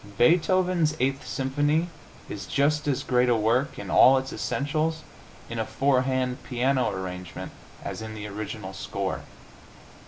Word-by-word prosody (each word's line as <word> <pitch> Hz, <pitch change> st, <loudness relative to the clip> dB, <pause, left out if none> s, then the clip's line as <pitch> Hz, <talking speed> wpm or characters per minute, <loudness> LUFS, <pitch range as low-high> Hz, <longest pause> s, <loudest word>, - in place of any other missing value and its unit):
Beethoven's 175 Hz, +2 st, +3 dB
Eighth 135 Hz, +1 st, 0 dB
Symphony 145 Hz, +7 st, +1 dB, 0.4 s
is 95 Hz, -3 st, -6 dB
just 145 Hz, +9 st, +1 dB
as 140 Hz, -3 st, 0 dB
great 125 Hz, -1 st, +2 dB
a 120 Hz, -, +4 dB
work, 120 Hz, +6 st, +1 dB
in -, -, -6 dB
all 135 Hz, +1 st, +7 dB
its 130 Hz, 0 st, -3 dB
essentials, 155 Hz, +3 st, -1 dB, 0.4 s
in 115 Hz, 0 st, -5 dB
a -, -, +1 dB
four 135 Hz, +3 st, +2 dB
hand 130 Hz, 0 st, -1 dB
piano 130 Hz, +1 st, +1 dB
arrangement 90 Hz, -2 st, -6 dB, 0.3 s
as -, -, -5 dB
in 110 Hz, 0 st, -6 dB
the 105 Hz, -1 st, -6 dB
original 105 Hz, +1 st, -6 dB
score. -, -, -3 dB
130 Hz, 145 wpm, -26 LUFS, 115-145 Hz, 0.4 s, all